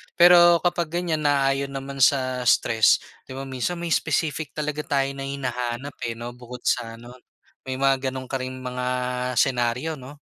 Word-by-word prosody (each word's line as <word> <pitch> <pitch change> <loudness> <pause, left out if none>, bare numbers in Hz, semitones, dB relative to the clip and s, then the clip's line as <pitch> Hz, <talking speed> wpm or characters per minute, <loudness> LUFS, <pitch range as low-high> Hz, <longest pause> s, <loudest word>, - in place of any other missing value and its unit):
Pero 175 -1 +7
kapag 175 -2 +1
ganyan 165 -3 -1
naayon 140 -1 +1
naman 135 0 -6
sa 130 -1 +2
stress 110 0 +4 0.3
di 130 - -8
ba 135 - -5
minsan 135 +6 -3
may 170 -1 -4
specific 155 0 0
talaga 150 0 -3
tayo 135 -1 +1
na 135 0 -6
hinahanap, 125 0 -4
eh, 115 - -4
'no 120 +1 -7
bukod 125 0 -11
sa 115 -2 -1
ano, 120 +1 -12 0.6
may 130 - -2
mga 135 0 +1
gano'n 130 -1 -7
ka 135 - -1
ring 130 0 -6
mga 125 0 -4 0.5
senaryo 125 +4 0
'no? 135 +3 -11
135 Hz, 170 wpm, -24 LUFS, 125-150 Hz, 0.6 s, Pero